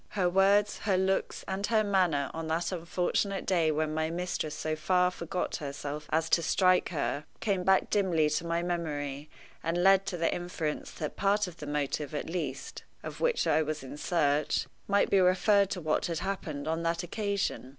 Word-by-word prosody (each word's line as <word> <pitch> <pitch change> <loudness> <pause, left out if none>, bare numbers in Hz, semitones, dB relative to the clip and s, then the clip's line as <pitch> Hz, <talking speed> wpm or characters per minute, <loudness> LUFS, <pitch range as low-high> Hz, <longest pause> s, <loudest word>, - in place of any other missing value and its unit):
Her 185 -2 +3
words, 200 +3 +3
her 195 -3 +1
looks, 190 +1 0
and 195 +1 -2
her 220 -2 +3
manner, 180 -8 +1
on 160 0 -4
that 165 +3 -1
unfortunate 180 +3 -1
day 170 -4 +2
when 155 0 0
my 160 0 0
mistress 170 -3 -3
so 155 0 -2
far 180 +3 +2
forget 180 +1 -3
herself 145 0 -5
as 160 +1 +1
to 170 - +5
strike, 185 +2 +3
her, 150 -2 -2
came 195 -4 0
back 190 +1 +3
dimly 180 -7 +2
to 150 +2 0
my 170 +1 0
memory, 150 -4 -3 0.3
and 175 +2 0
led 195 0 +5
to 180 - -2
the 165 0 +1
inference 175 -3 -3
that 150 - -5
part 205 +1 +2
of 175 -2 -9
the 150 - -8
motive, 145 0 -2
at - - -3
least, 155 -6 -4 0.2
of - - -7
which 485 -1 +2
I 160 - +3
was 155 -1 -3
in 135 - -8
search, 150 -2 +1 0.2
might 200 0 +2
be 195 - +5
referred 190 +2 +4
to 185 - -4
what 155 -1 0
had 170 -1 -2
happened 155 -7 -4
on 160 +1 -1
that 170 +1 -1
occasion. 200 - -2
170 Hz, 190 wpm, -29 LUFS, 155-190 Hz, 0.3 s, to